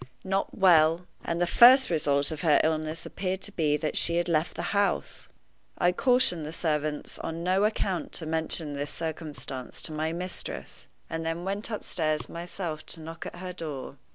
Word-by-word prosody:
Not 195 +1 -2
well! 170 -2 +5 0.2
And 170 - -2
the 175 - +3
first 250 +5 +7
result 145 -3 +1
of 155 -1 -5
her 155 -4 +5
illness 155 0 -1
appeared 190 0 -3
to 205 - 0
be 150 -5 +1
that 155 0 -3
she 170 - +4
had 175 0 +1
left 160 -1 0
the 175 +4 -3
house! 200 -1 0 0.5
I 175 - +3
cautioned 245 -6 +3
the 150 - -5
servants 155 -2 -2
on 165 +1 -4
no 190 +3 +2
account 195 -4 -1
to 165 - -4
mention 160 -1 -2
this 145 +1 -3
circumstance 155 -5 -5
to - - 0
my 155 +1 -1
mistress, 180 +2 -4 0.2
and 165 0 -4
then 165 +1 -3
went 200 +3 -3
upstairs 155 -8 -1
myself 170 -2 -5
to 165 - -2
knock 165 +1 -7
at - - -8
her 180 +1 -6
door. 150 -5 -6
165 Hz, 180 wpm, -28 LUFS, 155-180 Hz, 0.5 s, first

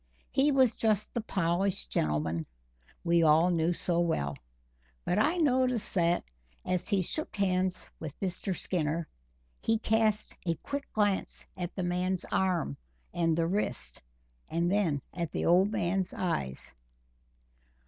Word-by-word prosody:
He 285 +2 +3
was 260 -4 +4
just 215 -2 +1
the 235 - -1
polished 180 - 0
gentleman 80 +3 0 0.6
we 170 -1 +3
all 160 +3 +5
knew 165 0 +2
so 175 0 0
well; 70 - 0 0.7
but 180 - +1
I 310 +10 +3
noticed 255 -7 +2
that, 170 -2 +2 0.4
as 180 -1 -1
he 195 -2 +2
shook 310 - -4
hands 185 -2 0
with 155 -2 -7
Mr. 185 -1 -2
Skinner, 165 -2 -1 0.5
he 225 - +2
cast 220 -1 +1
a 165 - +2
quick 280 - -5
glance 205 -3 0
at 180 -1 -5
the 185 - -2
man's 180 +1 -1
arm 175 - +1 0.4
and 165 -2 +1
the 165 - +2
wrist, 195 +5 -2 0.5
and 170 +2 +1
then 175 -9 +1
at 170 -3 -2
the - - -1
old 185 +4 +5
man's 190 -2 0
eyes. 70 - -2
180 Hz, 140 wpm, -30 LUFS, 165-205 Hz, 0.7 s, all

